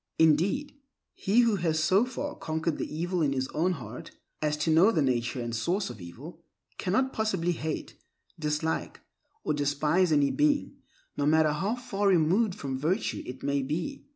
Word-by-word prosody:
Indeed, 185 Hz, -, +2 dB, 0.3 s
he 210 Hz, +5 st, +3 dB
who 230 Hz, -4 st, +3 dB
has 165 Hz, -3 st, 0 dB
so 185 Hz, +8 st, +4 dB
far 285 Hz, +3 st, -4 dB
conquered 160 Hz, 0 st, -2 dB
the -, -, -4 dB
evil 175 Hz, +3 st, -1 dB
in 145 Hz, -3 st, +2 dB
his 130 Hz, -1 st, -1 dB
own 180 Hz, +4 st, +1 dB
heart, 120 Hz, -7 st, -8 dB, 0.3 s
as 150 Hz, -1 st, 0 dB
to 160 Hz, -, +2 dB
know 170 Hz, +7 st, +6 dB
the 160 Hz, -8 st, +2 dB
nature 125 Hz, -1 st, 0 dB
and 120 Hz, -1 st, -3 dB
source 180 Hz, -, -1 dB
of 105 Hz, -, -11 dB
evil, 140 Hz, -, -10 dB, 0.4 s
cannot 260 Hz, +9 st, +1 dB
possibly 190 Hz, -6 st, 0 dB
hate, 160 Hz, -2 st, -4 dB, 0.4 s
dislike, 155 Hz, +1 st, -2 dB, 0.4 s
or -, -, 0 dB
despise 150 Hz, +5 st, +1 dB
any 145 Hz, -2 st, +3 dB
being, 295 Hz, -1 st, +1 dB, 0.4 s
no 145 Hz, -, +1 dB
matter 155 Hz, 0 st, +4 dB
how 190 Hz, +10 st, -1 dB
far 205 Hz, -5 st, -2 dB
removed 185 Hz, +3 st, +3 dB
from 135 Hz, -2 st, -4 dB
virtue 180 Hz, +9 st, -1 dB
it 130 Hz, +1 st, -8 dB
may 140 Hz, 0 st, +1 dB
be. 170 Hz, -, -4 dB
160 Hz, 170 wpm, -28 LUFS, 145-195 Hz, 0.4 s, know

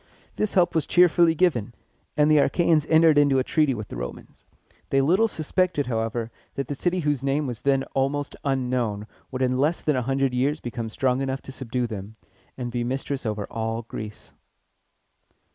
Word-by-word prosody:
This 215 Hz, -, -1 dB
help 180 Hz, -2 st, +4 dB
was 160 Hz, -3 st, 0 dB
cheerfully 175 Hz, -2 st, +5 dB
given, 125 Hz, -, +1 dB, 0.4 s
and 150 Hz, +1 st, +4 dB
the 155 Hz, -, +6 dB
Achæans 160 Hz, 0 st, +3 dB
entered 160 Hz, -2 st, +6 dB
into 140 Hz, -2 st, +4 dB
a 130 Hz, -, +2 dB
treaty 150 Hz, -2 st, +1 dB
with 105 Hz, -2 st, -7 dB
the -, -, -7 dB
Romans. -, -, -8 dB, 0.4 s
They 135 Hz, -, +3 dB
little 180 Hz, +11 st, +3 dB
suspected, 165 Hz, -4 st, 0 dB
however, 115 Hz, -1 st, -2 dB, 0.2 s
that 140 Hz, -2 st, -3 dB
the -, -, -1 dB
city 175 Hz, +5 st, -1 dB
whose 145 Hz, -4 st, 0 dB
name 140 Hz, +2 st, 0 dB
was 120 Hz, -3 st, -4 dB
then 135 Hz, 0 st, +2 dB
almost 140 Hz, +2 st, -1 dB
unknown 125 Hz, -6 st, -1 dB, 0.2 s
would 130 Hz, 0 st, -2 dB
in 130 Hz, 0 st, +1 dB
less 155 Hz, +5 st, +1 dB
than 150 Hz, -, +1 dB
a 130 Hz, -, +1 dB
hundred 135 Hz, +1 st, 0 dB
years 140 Hz, +5 st, +1 dB
become 120 Hz, -1 st, -5 dB
strong 130 Hz, +3 st, 0 dB
enough 135 Hz, 0 st, -3 dB
to -, -, -9 dB
subdue 125 Hz, -2 st, -3 dB
them, 105 Hz, -1 st, -7 dB, 0.4 s
and 120 Hz, -2 st, -4 dB
be 120 Hz, 0 st, -1 dB
mistress 135 Hz, +1 st, -3 dB
over 105 Hz, -1 st, -2 dB
all 115 Hz, +1 st, -3 dB
Greece. 110 Hz, -1 st, -9 dB
135 Hz, 180 wpm, -25 LUFS, 120-150 Hz, 0.4 s, the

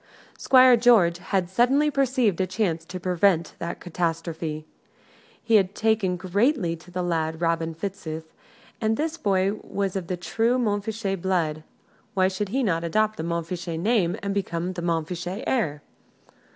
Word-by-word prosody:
Squire 255 Hz, -1 st, +6 dB
George 220 Hz, -8 st, +4 dB
had 185 Hz, 0 st, -1 dB
suddenly 260 Hz, +10 st, +3 dB
perceived 255 Hz, -, +1 dB
a 185 Hz, -, 0 dB
chance 180 Hz, -4 st, -1 dB
to 185 Hz, +2 st, -7 dB
prevent 180 Hz, -2 st, +1 dB
that 170 Hz, +1 st, -4 dB
catastrophe. 165 Hz, -2 st, -3 dB, 0.8 s
He 225 Hz, -1 st, +5 dB
had 195 Hz, 0 st, 0 dB
taken 220 Hz, -5 st, +1 dB
greatly 195 Hz, -, +1 dB
to 170 Hz, +2 st, -17 dB
the 180 Hz, 0 st, -3 dB
lad 160 Hz, -2 st, -1 dB
Robin 165 Hz, -1 st, 0 dB
Fitzooth: 160 Hz, -4 st, -6 dB, 0.5 s
and 220 Hz, 0 st, +1 dB
this 320 Hz, +1 st, -1 dB
boy 195 Hz, -, +1 dB
was 200 Hz, -2 st, -3 dB
of 185 Hz, -3 st, -3 dB
the 180 Hz, -, -2 dB
true 225 Hz, +9 st, 0 dB
Montfichet 205 Hz, -4 st, -1 dB
blood 165 Hz, -5 st, 0 dB, 0.5 s
why 185 Hz, -1 st, +3 dB
should 195 Hz, +1 st, -3 dB
he 265 Hz, +5 st, 0 dB
not 165 Hz, -6 st, 0 dB
adopt 215 Hz, +6 st, +1 dB
the 160 Hz, -, -4 dB
Montfichet 170 Hz, 0 st, -3 dB
name 195 Hz, -3 st, +1 dB
and 200 Hz, 0 st, -1 dB
become 180 Hz, -2 st, -2 dB
the 175 Hz, -, -5 dB
Montfichet 175 Hz, +3 st, -2 dB
heir? 150 Hz, -, -1 dB
185 Hz, 150 wpm, -25 LUFS, 170-215 Hz, 0.8 s, Squire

